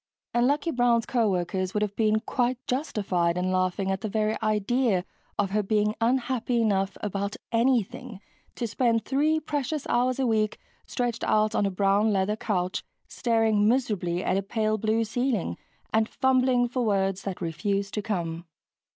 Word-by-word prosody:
And 240 +1 +3
Lucky 290 +4 +1
Brown's 240 -3 +2
co 235 -4 +1
workers 185 +1 -2
would 210 - +2
have 205 -1 -3
been 215 -1 +2
quite 245 +1 0
justified 195 - 0
in 185 +1 0
laughing 185 +1 0
at 190 0 -2
the 215 - -3
very 215 +1 0
idea 215 -2 +1 0.3
of 200 -2 0
her 210 +1 +2
being 210 +1 +1
unhappy 245 0 +1
enough 195 -4 +1
about 200 0 -2 0.2
anything 240 -1 0 0.4
to 240 - -2
spend 230 0 +1
three 300 +4 +2
precious 295 -1 -3
hours 250 +1 +1
a 270 - +1
week 215 -2 +1 0.3
stretched 245 -2 -2
out 215 0 +2
on 205 - +2
a - - 0
brown 200 +3 +2
leather 195 +1 +1
couch 185 -4 -2 0.2
staring 225 -3 +2
miserably 205 -8 0
at 185 - +1
a - - +1
pale 215 +1 -1
blue 220 +2 +1
ceiling 225 - -1 0.4
and 220 0 +2
fumbling 255 -2 +2
for 250 +1 -2
words 195 -3 +1
that 195 -2 -5
refused 195 +4 -2
to 210 - -1
come. 170 -5 -3
215 Hz, 165 wpm, -26 LUFS, 195-245 Hz, 0.4 s, And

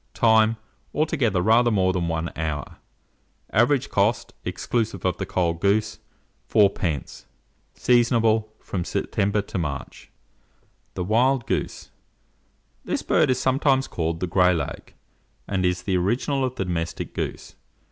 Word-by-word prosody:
Time. 110 -1 +4 0.4
Altogether, 135 - +1
rather 115 +3 +4
more 95 -4 +2
than 90 -2 -1
1 80 0 -2
hour. 75 -3 -4 0.8
Average 125 +4 +3
cost, 100 +4 +1
exclusive 110 -6 -2
of 90 -2 +1
the 95 - -4
cold 85 -3 -1
goose, 105 +2 +1 0.5
4d. 90 -8 +1 0.5
Seasonable 115 -3 +2
from 90 -3 -4
September 100 +3 -1
to 95 - -4
March. 75 -4 -5 0.9
THE 90 - -2
WILD 120 +6 +2
GOOSE. - - -3 0.9
This - - -2
bird - - +3
is 130 - +2
sometimes 135 0 +2
called 80 -1 -3
the - - +1
"Gray 90 0 +3
lag" 80 -4 -5 0.5
and 95 -2 -1
is 90 0 0
the 95 -1 0
original 120 +9 0
of 130 -1 -2
the 95 - -2
domestic 85 -2 -3
goose. - - -5
100 Hz, 130 wpm, -24 LUFS, 90-120 Hz, 0.9 s, Time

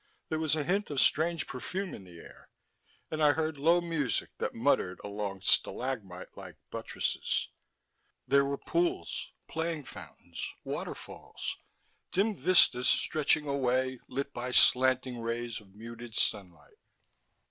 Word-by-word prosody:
There 155 - -1
was 155 -1 +2
a 155 - -1
hint 195 +7 0
of 145 -3 -1
strange 165 +3 +3
perfume 185 +9 -5
in 95 - -9
the 90 -2 -13
air, - - -15 0.6
and 155 0 -2
I 150 -1 +6
heard 155 -2 -2
low 165 +4 +4
music 150 - -1
that - - -2
muttered 90 0 +1
among 100 -1 -4
stalagmite 100 -4 0
like - - -10 0.2
buttresses. - - -2 0.8
There 140 0 +5
were 140 0 -2
pools, 350 - -1 0.2
playing 160 -2 -3
fountains, - - -10 0.2
waterfalls, - - -6 0.6
dim 205 +3 +1
vistas 175 -9 +5
stretching 155 0 +2
away, 130 -2 0
lit 140 +1 -4
by 125 +1 -4
slanting 130 0 +4
rays 115 0 -3
of 100 -1 -21
muted 115 +1 -9
sunlight. 95 -6 -2
135 Hz, 130 wpm, -30 LUFS, 115-160 Hz, 0.8 s, I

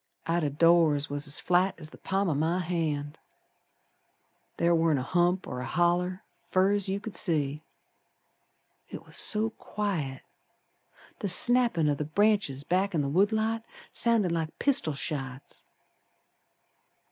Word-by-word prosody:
Out 165 0 0
o' 150 - +1
doors 155 -1 +3
was 145 +1 -2
as 145 - +3
flat 180 +2 +1
as 155 -1 -10
the - - -13
palm 195 +1 -1
o' 165 - +1
my 160 +5 0
hand, 160 -4 -3 1.4
Ther 170 0 +2
warn't 165 -2 +2
a 130 - -2
hump 175 +5 +1
or 125 - -6
a 125 - -5
holler 175 +4 0 0.3
Fer 190 +1 +3
as 205 -2 -1
you 195 +1 -1
could 210 -2 -8
see. 150 -4 0 1.3
It - - -9
was - - -12
so 220 +1 +3
quiet 170 -14 -4 1.0
The 200 - -3
snappin' 235 -5 +3
o' 145 - +2
the 145 - -3
branches 195 -4 +1
back 185 +4 0
in 155 - +2
the 140 - -2
wood 195 +8 +2
lot 220 +1 -1 0.3
Sounded 230 -6 +2
like 165 -2 -3
pistol 260 - +1
shots. 135 -3 -6
170 Hz, 145 wpm, -28 LUFS, 150-195 Hz, 1.4 s, doors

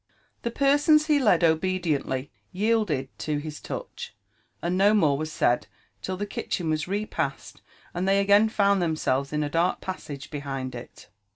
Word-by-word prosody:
The 235 - -2
persons 290 +4 +4
he 300 -2 +3
led 195 -10 +3
obediently 160 -5 0 0.2
yielded 190 -10 0
4o 150 -1 -2
his 150 0 -7
touch, - - -7 0.4
and 175 +1 -1
no 200 +3 +4
more 155 -9 +3
was 155 +2 -4
said 120 -5 +1 0.3
till 185 0 -4
the 205 - -2
kitchen 175 -4 -3
was 155 +1 -1
repassed 180 -8 -3 0.3
and 180 +2 -2
they 195 +1 +4
again, 205 +2 +5
found 200 -3 +2
themselves 140 -5 0
in 150 0 -1
the 145 - -1
dark 165 +4 +1
passage 145 -7 -7
behind 135 -3 -4
it. 120 0 -11
175 Hz, 160 wpm, -26 LUFS, 145-205 Hz, 0.4 s, again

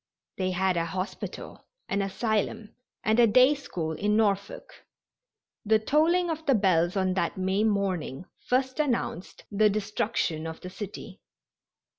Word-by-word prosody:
They 185 -1 0
had 185 0 +1
a 165 - +1
hospital, 185 +3 -6 0.2
an 200 +1 0
asylum 210 +1 -2 0.3
and 220 +2 +2
a 235 - +7
day 255 +6 +6
school 175 - -4
in 210 +6 0
Norfolk. 200 -2 -1 0.8
The 220 +1 +4
tolling 320 +10 +2
of 320 0 -4
the 275 - +5
bells 180 -3 +2
on 190 -1 +1
that 170 -2 -1
May 190 +2 +1
morning 190 -8 -1 0.2
first 260 +2 0
announced 240 - -2
the 210 +1 +4
destruction 205 -5 -1
of 160 0 -7
the 180 - -8
city. 200 0 -8
200 Hz, 140 wpm, -27 LUFS, 185-225 Hz, 0.8 s, a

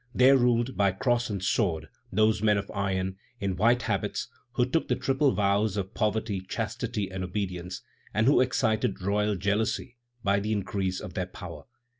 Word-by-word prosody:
There 130 +2 +7
ruled, 120 0 +2
by 100 -2 +3
cross 120 +3 +1
and 100 -3 -3
sword, 95 -5 +1 0.2
those 110 +1 +3
men 105 -1 +4
of 100 0 -4
iron, 95 -1 -1 0.2
in 100 -2 -1
white 120 +5 +3
habits, - - -1 0.2
who 125 - +2
took 145 +6 0
the - - +2
triple 135 +1 +2
vows 100 0 +1
of 100 +1 -3
poverty, 110 -2 0
chastity, 110 0 -3
and 95 0 -4
obedience, 90 -2 -4 0.3
and 110 +1 +1
who 135 0 +5
excited 110 -5 +1
royal 105 +1 +1
jealousy 105 +5 -1 0.3
by 100 0 +3
the 105 +2 -1
increase 95 -2 -2
of - - -7
their - - -2
power. - - -9
105 Hz, 170 wpm, -28 LUFS, 95-115 Hz, 0.3 s, There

